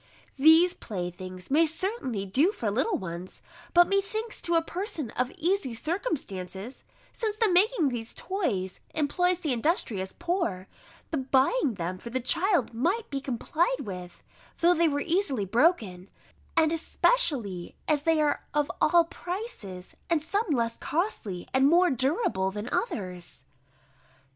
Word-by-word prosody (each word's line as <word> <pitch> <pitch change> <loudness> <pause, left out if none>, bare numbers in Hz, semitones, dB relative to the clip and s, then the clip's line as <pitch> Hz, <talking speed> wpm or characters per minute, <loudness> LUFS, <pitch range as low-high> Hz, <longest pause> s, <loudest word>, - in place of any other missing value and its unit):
These 320 +5 +7
playthings 185 0 -6
may 310 +4 +5
certainly 325 - -1
do 275 - +3
for 225 - -2
little 265 - +1
ones: 175 0 -7 0.3
but 350 0 +6
methinks, 405 +3 -1
to 340 - 0
a 330 - +5
person 335 - -4
of 250 0 -1
easy 340 -7 0
circumstances, 235 - -4 0.3
since 435 -3 -2
the 445 0 +3
making 360 - +4
these 230 -2 -5
toys 220 - -2 0.2
employs 355 +4 +2
the 300 -6 0
industrious 230 - -1
poor, 340 - -2 0.4
the 315 - 0
buying 265 - +2
them 180 0 -4
for 235 - -8
the 260 +2 -1
child 335 - +2
might 355 - -1
be 275 -1 -2
complied 320 - 0
with, 180 -5 -8 0.3
though 345 +1 +5
they 335 -1 +3
were 285 -2 0
easily 320 - 0
broken; 205 - +1 0.5
and 320 -1 +4
especially 285 - 0
as 300 -2 +2
they 325 +1 +2
are 300 -1 +1
of 295 -1 +1
all 340 +2 +5
prices, 335 - -6
and 335 -2 +3
some 405 +8 0
less 235 -5 0
costly, 295 - -2
and 265 +1 +5
more 350 +1 +5
durable 260 - 0
than 205 +3 -5
others. 180 - -4
290 Hz, 140 wpm, -28 LUFS, -, 0.5 s, These